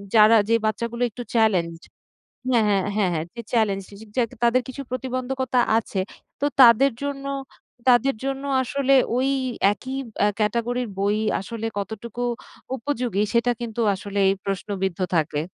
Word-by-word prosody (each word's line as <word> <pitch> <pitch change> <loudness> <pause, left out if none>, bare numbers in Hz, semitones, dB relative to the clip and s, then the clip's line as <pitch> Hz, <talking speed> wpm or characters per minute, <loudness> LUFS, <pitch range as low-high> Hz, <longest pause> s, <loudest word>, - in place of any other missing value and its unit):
যারা 220 +1 +7
যে 230 - +5
বাচ্চাগুলো 235 +2 -2
একটু 240 +3 -7
চ্যালেঞ্জ 190 -8 +2 0.8
হ্যাঁ, 235 -4 +4
হ্যাঁ, 195 -2 +2
হ্যাঁ, 200 -4 +2
হ্যাঁ 155 - -1
জি 235 - -6
চ্যালেঞ্জড 200 -5 +1
জি, - - -12
জি, 220 - -10
যা 250 - +4 0.2
তাদের 245 +2 +3
কিছু 275 +2 -6
প্রতিবন্ধকতা 255 0 -1 0.2
আছে 200 -3 -3 0.4
তো - - 0 0.2
তাদের 245 +3 +7
জন্য 275 -1 -4 0.7
তাদের 250 +3 +4
জন্য 270 0 -2 0.2
আসলে 275 +2 +1 0.2
ঐ - - +2 0.5
একই 260 +5 -7 0.3
আ - - +5
ক্যাটাগরির 235 +3 0
বই 205 +2 +1 0.2
আসলে 225 +3 -5
কতটুকু 220 +3 -5 0.5
উপযোগী 240 -5 -1
সেটা 235 +1 +3
কিন্তু 235 -1 -4
আসলেই 200 0 +1
প্রশ্নবিদ্ধ 195 -2 -2 0.2
থাকে। 150 -2 0
230 Hz, 145 wpm, -23 LUFS, 205-250 Hz, 0.8 s, যারা